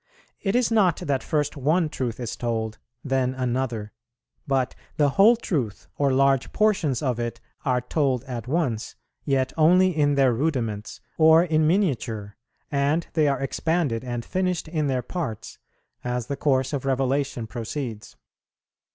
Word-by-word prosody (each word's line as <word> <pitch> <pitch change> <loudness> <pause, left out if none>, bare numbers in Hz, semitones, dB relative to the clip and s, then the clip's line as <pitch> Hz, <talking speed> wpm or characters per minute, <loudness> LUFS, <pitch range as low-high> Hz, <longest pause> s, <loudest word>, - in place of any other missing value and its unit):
It 195 +1 0
is 245 -2 +2
not 195 -7 +3
that 140 -2 -1
first 150 -1 -1
one 155 +5 +2
truth 125 -6 -4
is 120 -2 -4
told, 110 -2 -3 0.2
then 130 -2 0
another; 125 -4 -2 0.6
but 135 -2 +1 0.2
the 145 -2 +4
whole 200 - +6
truth 135 - -3
or 140 -1 +2
large 135 0 +2
portions 185 - +1
of 125 -4 0
it 120 -1 -3 0.3
are 125 -2 +2
told 130 -1 0
at 125 -4 -6
once, 130 -7 -1 0.3
yet 135 -2 +1
only 180 +3 +5
in 145 -2 +2
their 135 -3 +4
rudiments, 115 -6 -2 0.2
or 160 +1 +7
in 155 -3 +2
miniature, 120 - 0 0.4
and 145 +4 +1
they 155 -2 +3
are 140 -2 +1
expanded 140 -4 0
and 120 -2 -4
finished 180 -3 -1
in 155 -2 -1
their 130 -2 0
parts, 125 - -5 0.4
as 125 -1 -2
the 140 - -3
course 130 -1 +1
of 140 - -2
revelation 135 -2 0
proceeds. 115 0 -6
135 Hz, 150 wpm, -25 LUFS, 125-155 Hz, 0.6 s, or